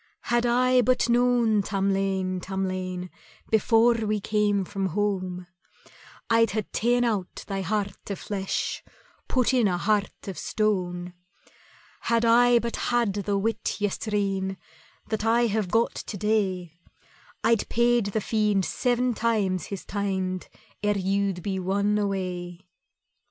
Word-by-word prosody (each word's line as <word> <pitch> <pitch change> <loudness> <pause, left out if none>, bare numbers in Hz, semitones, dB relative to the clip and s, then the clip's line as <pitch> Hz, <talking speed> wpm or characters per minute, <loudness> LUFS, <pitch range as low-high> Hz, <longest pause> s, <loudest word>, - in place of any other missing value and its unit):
"Had 240 0 +3
I 250 +1 +4
but 250 +1 +2
known, 240 -3 +3
Tamlane, 195 -1 0
Tamlane, 185 -1 -3 0.4
Before 225 +2 +4
we 215 -2 -1
came 205 -1 +1
from 195 0 -2
home, 185 -1 -2 0.8
I'd 230 0 +4
hae 215 -1 -1
ta'en 245 +2 +2
out 210 -6 -2
thy 195 -1 -3
heart 200 0 -3
o' 200 - -2
flesh, 195 0 -3 0.4
Put 255 0 +2
in 245 -4 +4
a 180 -2 0
heart 205 +3 -1
of 195 - -5
stone. 180 -4 -1 0.9
"Had 230 0 +1
I 240 +1 +6
but 235 0 -2
had 240 -4 +1
the 200 0 -1
wit 220 +2 -1
yestreen 195 -2 -1 0.5
That 215 -1 -1
I 230 +2 +3
have 215 -4 -1
got 230 +4 +2
to 205 - -6
day, 185 -5 -1 0.6
I'd 230 -3 +2
paid 240 -1 +3
the 210 +2 -1
Fiend 210 -3 +1
seven 245 0 0
times 205 -7 0
his 200 -2 -6
teind 190 -2 -2 0.3
Ere 210 -1 +1
you'd 195 -1 0
been 190 -2 -2
won 200 +3 +1
away." 185 -3 -3
205 Hz, 130 wpm, -26 LUFS, 190-230 Hz, 0.9 s, I